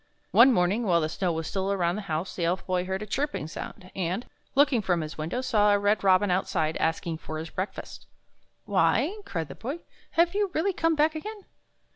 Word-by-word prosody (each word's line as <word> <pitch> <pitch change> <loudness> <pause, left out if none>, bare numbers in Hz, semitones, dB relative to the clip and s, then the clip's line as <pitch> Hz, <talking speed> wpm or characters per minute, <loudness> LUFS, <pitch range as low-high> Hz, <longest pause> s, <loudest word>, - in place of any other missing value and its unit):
One 260 +3 +7
morning, 195 +1 +2
while 170 -2 +4
the 155 - -1
snow 180 +2 -1
was 160 0 -3
still 195 +3 -1
around 175 -3 +1
the 210 - -3
house, 160 +4 -2
the 175 - -2
Elf 175 +3 0
Boy 180 -1 0
heard 190 +2 -3
a - - -5
chirping 275 - -2
sound, 185 +3 -8
and, 185 +5 -2 0.3
looking 275 -4 +4
from 180 -4 +1
his 155 0 -6
window, 160 +11 -3
saw 210 -5 +3
a 205 - +5
red 205 +1 +1
robin 190 0 +4
outside 165 -3 0
asking 165 0 -1
for 155 - -6
his 160 +1 -6
breakfast. 185 +2 -6 0.3
" - - -44
Why," 395 +8 +2
cried 165 - -3
the - - -6
Boy, 280 +9 -5 0.2
" - - -30
have 340 +1 +4
you 405 -1 +1
really 375 +5 +1
come 330 -1 +1
back 305 +1 +3
again? 415 +5 -7
195 Hz, 215 wpm, -27 LUFS, 170-265 Hz, 0.3 s, One